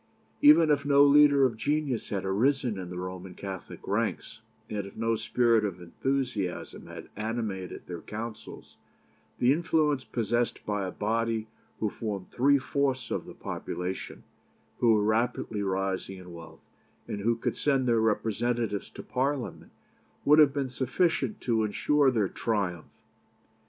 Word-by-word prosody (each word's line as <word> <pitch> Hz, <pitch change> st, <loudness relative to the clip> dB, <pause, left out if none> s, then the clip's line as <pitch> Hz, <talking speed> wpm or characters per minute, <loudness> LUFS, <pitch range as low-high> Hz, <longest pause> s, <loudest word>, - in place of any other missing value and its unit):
Even 290 Hz, -, +7 dB
if 145 Hz, -1 st, +2 dB
no 140 Hz, 0 st, +5 dB
leader 145 Hz, -1 st, +6 dB
of 120 Hz, -3 st, 0 dB
genius 145 Hz, +1 st, -1 dB
had 95 Hz, -2 st, -2 dB
arisen 120 Hz, +2 st, +1 dB
in 90 Hz, -1 st, -6 dB
the 90 Hz, -, -6 dB
Roman 90 Hz, 0 st, -6 dB
Catholic 95 Hz, -2 st, -8 dB
ranks, 110 Hz, +1 st, -2 dB, 0.3 s
and 100 Hz, -2 st, -4 dB
if 100 Hz, -, -13 dB
no 115 Hz, 0 st, +1 dB
spirit 115 Hz, 0 st, +2 dB
of 95 Hz, -4 st, -3 dB
enthusiasm 110 Hz, +1 st, -3 dB
had -, -, -9 dB
animated 105 Hz, -4 st, -4 dB
their 85 Hz, -2 st, -7 dB
councils, 110 Hz, 0 st, -8 dB, 0.6 s
the 125 Hz, +2 st, +4 dB
influence 150 Hz, -4 st, +1 dB
possessed 120 Hz, 0 st, -1 dB
by 105 Hz, -2 st, -1 dB
a -, -, -4 dB
body 115 Hz, +1 st, -1 dB, 0.3 s
who 110 Hz, -2 st, 0 dB
formed 100 Hz, -4 st, -5 dB
three 140 Hz, +3 st, +4 dB
fourths 135 Hz, -1 st, -1 dB
of -, -, -2 dB
the -, -, -10 dB
population, 90 Hz, +1 st, -5 dB, 0.6 s
who 115 Hz, -2 st, +5 dB
were 105 Hz, -, +2 dB
rapidly 110 Hz, -1 st, 0 dB
rising 95 Hz, 0 st, -2 dB
in 90 Hz, -1 st, -11 dB
wealth, 85 Hz, -1 st, -12 dB, 0.4 s
and 105 Hz, -, -4 dB
who 115 Hz, +3 st, +2 dB
could 115 Hz, -, -2 dB
send 135 Hz, -3 st, +1 dB
their 115 Hz, -2 st, +3 dB
representatives 110 Hz, 0 st, 0 dB
to -, -, -10 dB
Parliament, 135 Hz, 0 st, -2 dB, 0.5 s
would 150 Hz, +2 st, +7 dB
have 150 Hz, -3 st, +7 dB
been 135 Hz, -2 st, -2 dB
sufficient 135 Hz, 0 st, 0 dB
to 115 Hz, -3 st, +1 dB
ensure 140 Hz, +7 st, +2 dB
their 110 Hz, -6 st, +1 dB
triumph. 95 Hz, -7 st, -2 dB
115 Hz, 145 wpm, -28 LUFS, 100-135 Hz, 0.6 s, Even